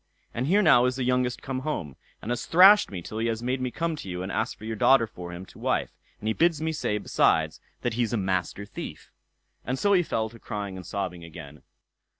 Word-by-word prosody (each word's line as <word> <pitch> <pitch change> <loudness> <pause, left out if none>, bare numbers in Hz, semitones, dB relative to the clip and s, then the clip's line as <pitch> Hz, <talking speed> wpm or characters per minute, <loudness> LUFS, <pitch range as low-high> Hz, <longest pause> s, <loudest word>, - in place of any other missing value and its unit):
"And 125 +3 -2
here 205 +6 +4
now 130 -7 +6
is 125 0 +1
the 130 - -2
youngest 125 0 0
come 130 -2 -3
home, 130 - -4 0.3
and 115 - -3
has 120 0 -3
thrashed 195 +5 +7
me 90 -3 -6
till 110 - -6
he 115 - 0
has 115 0 -2
made 130 +1 -1
me 130 - -1
come 165 +5 -2
to 100 - -8
you 90 0 -4
and 95 - -5
ask 110 +3 -2
for 110 - -11
your 110 0 -3
daughter 130 +3 +5
for 90 -5 -9
him 90 +2 -8
to - - -16
wife; - - 0 0.3
and 110 - -5
he 110 - +2
bids 165 +1 +2
me 160 0 -1
say, 150 -9 -1
besides, - - +1 0.2
that 120 - 0
he's 115 -1 0
a 120 - 0
Master 95 0 -1
Thief." 105 - -8 0.5
And 130 +2 -2
so 200 +7 +2
he 185 - +5
fell 110 -9 -1
to 115 +1 -15
crying 100 -3 -5
and 90 -1 -9
sobbing 90 -4 -4
again. 80 -3 -11
115 Hz, 240 wpm, -26 LUFS, 95-135 Hz, 0.5 s, thrashed